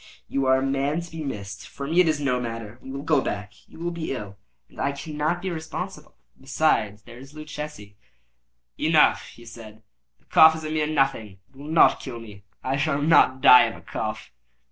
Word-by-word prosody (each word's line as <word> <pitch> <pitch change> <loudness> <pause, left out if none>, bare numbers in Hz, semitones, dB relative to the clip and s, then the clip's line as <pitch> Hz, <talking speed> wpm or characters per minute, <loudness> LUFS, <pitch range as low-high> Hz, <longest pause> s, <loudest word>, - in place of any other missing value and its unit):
You 135 -1 -1
are 130 0 +5
a 130 - -1
man 140 +4 -1
to 170 - -11
be 165 -1 -6
missed. 100 -8 -7
For 140 - -8
me 165 +5 +1
it 180 - +2
is 155 -2 +1
no 130 -3 0
matter. 115 -1 -6
We - - -11
will 140 +1 -6
go 150 -3 +2
back; 105 -2 -5
you - - -16
will 170 +1 -3
be 170 -2 -5
ill, 105 -6 -7 0.3
and - - -10
I 140 - 0
cannot 155 +4 -3
be 190 - -2
responsible. 160 0 -7 0.2
Besides, 115 -7 0
there 120 +1 -13
is 135 +3 -14
Luchesi—" 150 -9 -8 0.8
"Enough," 155 -1 +3
he 120 - -15
said; 110 -1 -12 0.3
"the - - -36
cough 160 0 +6
is 160 - -7
a 155 - -4
mere 155 -1 0
nothing; 135 -9 -1
it - - -31
will 140 +2 -11
not 160 +1 +4
kill 125 -4 -7
me. 105 -3 -12 0.2
I 135 +1 -1
shall 145 0 0
not 145 -4 +4
die 125 -1 +8
of - - -4
a - - -13
cough." - - -5
140 Hz, 210 wpm, -24 LUFS, 115-155 Hz, 0.8 s, die